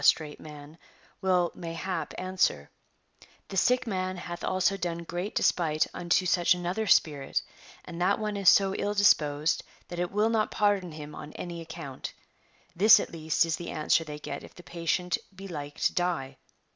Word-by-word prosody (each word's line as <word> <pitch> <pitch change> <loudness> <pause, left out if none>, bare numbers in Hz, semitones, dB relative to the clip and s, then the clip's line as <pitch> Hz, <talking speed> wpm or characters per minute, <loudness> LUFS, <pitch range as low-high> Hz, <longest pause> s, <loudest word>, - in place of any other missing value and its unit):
trate 150 -2 -1
man 150 0 -11 0.5
will 180 -2 +2
(mayha))) 165 0 -4
answer: 185 - 0 0.4
" - - -25
The - - -6
sick 250 +6 +3
man 185 -4 -2
hath 175 0 -7
also 185 +1 +1
done 170 -3 -3
great 175 +5 -4
despite 155 -3 +2
unto 175 +1 +1
such 175 0 +3
another 180 +5 -2
spirit, 145 -6 +2 0.4
and 170 +1 -7
that 190 +3 +3
one 215 -1 -3
is 200 -2 +5
so 195 -1 +5
ill 205 +1 -2
disposed 150 -6 +3 0.3
that 175 - -5
it 175 0 -1
will 210 +2 +2
not 220 -2 +1
})ardon 200 -5 +2
him 150 -1 -8
on 150 0 -9
any 170 -1 -6
account 155 -5 -7 0.2
;" - - -37
— - - -34
this 215 +1 +9
at - - -4
least 160 0 +1
is 165 -1 -1
the 170 - -6
answer 155 +2 +2
they 150 -2 -7
get 150 - -6
if - - -13
the 175 - -13
patient 175 +1 -1 0.2
be 195 +1 -9
like 145 -5 -7
to - - +2
die. 160 -7 -1
175 Hz, 185 wpm, -28 LUFS, 155-190 Hz, 0.5 s, this